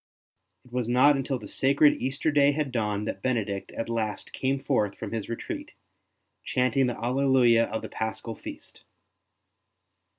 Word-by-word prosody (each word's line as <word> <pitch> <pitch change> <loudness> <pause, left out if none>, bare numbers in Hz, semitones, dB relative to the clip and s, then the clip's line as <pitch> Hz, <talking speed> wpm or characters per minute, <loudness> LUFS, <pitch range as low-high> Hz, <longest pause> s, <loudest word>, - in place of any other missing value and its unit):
It 125 - -19
was 125 -2 -1
not 130 +4 +5
until 135 0 -1
the - - -10
sacred 140 +2 +3
Easter 135 +4 0
day 145 -1 +4
had 145 -2 -2
dawned 105 -3 -1
that - - -4
Benedict 105 -6 -2
at 115 - -4
last 110 -2 -3
came 135 +1 0
forth 125 -8 0
from 110 - -6
his 110 -3 -4
retreat, 115 - -5 0.7
chanting 125 +1 +1
the 120 - -3
Alleluia 125 -2 +3
of 110 - -4
the - - -6
Paschal 110 +1 -4
feast. - - -10
125 Hz, 155 wpm, -27 LUFS, 110-135 Hz, 0.7 s, not